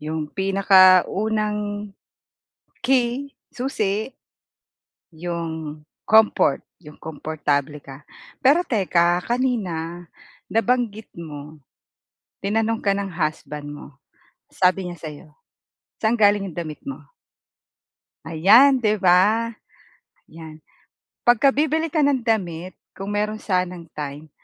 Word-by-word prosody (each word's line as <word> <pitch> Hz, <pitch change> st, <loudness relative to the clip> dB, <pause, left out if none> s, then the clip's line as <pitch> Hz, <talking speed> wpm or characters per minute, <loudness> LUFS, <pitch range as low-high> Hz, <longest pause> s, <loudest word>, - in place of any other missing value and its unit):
Yung 155 Hz, 0 st, -4 dB
pinakaunang 205 Hz, +2 st, +3 dB, 0.9 s
key, 260 Hz, +2 st, +1 dB, 0.2 s
susi. 220 Hz, -3 st, -2 dB, 1.0 s
Yung 160 Hz, -2 st, -5 dB, 0.3 s
comfort, 220 Hz, -10 st, +4 dB, 0.2 s
yung 150 Hz, -3 st, -14 dB
komportable 150 Hz, -2 st, -3 dB
ka. 135 Hz, +1 st, -12 dB, 0.4 s
Pero 290 Hz, +7 st, +4 dB
teka 175 Hz, -, +2 dB
kanina 180 Hz, -9 st, -2 dB, 0.4 s
nabanggit 225 Hz, -1 st, 0 dB
mo, 150 Hz, -2 st, -9 dB, 0.8 s
tinanong 225 Hz, +2 st, 0 dB
ka 200 Hz, -, +3 dB
ng 200 Hz, -1 st, -3 dB
husband 155 Hz, -2 st, -4 dB
mo 145 Hz, -, -10 dB, 0.7 s
sabi 185 Hz, +1 st, +2 dB
niya 175 Hz, -1 st, -7 dB
sa'yo 155 Hz, -1 st, -9 dB, 0.7 s
"saan 225 Hz, +2 st, +2 dB
galing 205 Hz, -2 st, +3 dB
'yong 165 Hz, -, -14 dB
damit 155 Hz, -3 st, -6 dB
mo?" 275 Hz, -, -6 dB, 1.3 s
Ayan 225 Hz, -, +5 dB
'di 215 Hz, -1 st, +2 dB
ba? 205 Hz, +5 st, +3 dB, 0.8 s
Yan 160 Hz, -1 st, -12 dB, 0.7 s
pag 240 Hz, -, +6 dB
ka 275 Hz, +5 st, +4 dB
bibili 310 Hz, +2 st, 0 dB
ka 315 Hz, -, +1 dB
ng 280 Hz, -4 st, +2 dB
damit 185 Hz, -6 st, -1 dB, 0.2 s
kung 195 Hz, +1 st, -5 dB
meron 210 Hz, +1 st, -1 dB
sanang 180 Hz, -3 st, -2 dB
time 150 Hz, +1 st, -7 dB
195 Hz, 100 wpm, -22 LUFS, 160-225 Hz, 1.3 s, pag